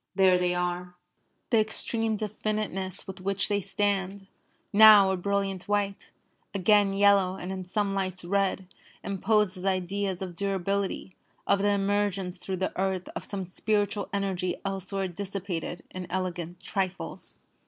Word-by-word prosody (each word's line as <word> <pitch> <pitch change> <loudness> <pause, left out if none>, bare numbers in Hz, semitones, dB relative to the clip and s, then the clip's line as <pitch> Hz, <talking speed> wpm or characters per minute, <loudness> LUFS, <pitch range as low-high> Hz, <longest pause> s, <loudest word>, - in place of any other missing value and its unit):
There 185 -1 +5
they 180 0 +1
are. 180 0 -2 0.6
The 230 - +5
extreme 220 +1 0
definiteness 210 -3 -3
with 190 -1 -8
which 195 +1 0
they 205 -1 +1
stand, 195 0 -1 0.5
now 210 -2 +9
a - - +1
brilliant 195 0 -1
white, 205 -1 -1 0.5
again 200 +1 +4
yellow, 195 -2 +4
and 185 0 -6
in 190 -1 -5
some 200 +2 0
lights 185 -2 -2
red, 195 0 0 0.4
imposes 200 -1 +1
ideas 190 0 -1
of 180 -2 -6
durability, 195 +1 -2 0.3
of 200 - +3
the 205 +1 +2
emergence 200 -2 0
through 190 +1 -4
the 190 +1 -2
earth 190 -1 -1
of - - -6
some 200 -2 -4
spiritual 205 +2 -1
energy 190 -3 -1
elsewhere 195 0 -2
dissipated 185 -2 -4
in 180 -1 -6
elegant 180 -2 -3
trifles. 190 -2 -3
195 Hz, 135 wpm, -28 LUFS, 185-200 Hz, 0.6 s, now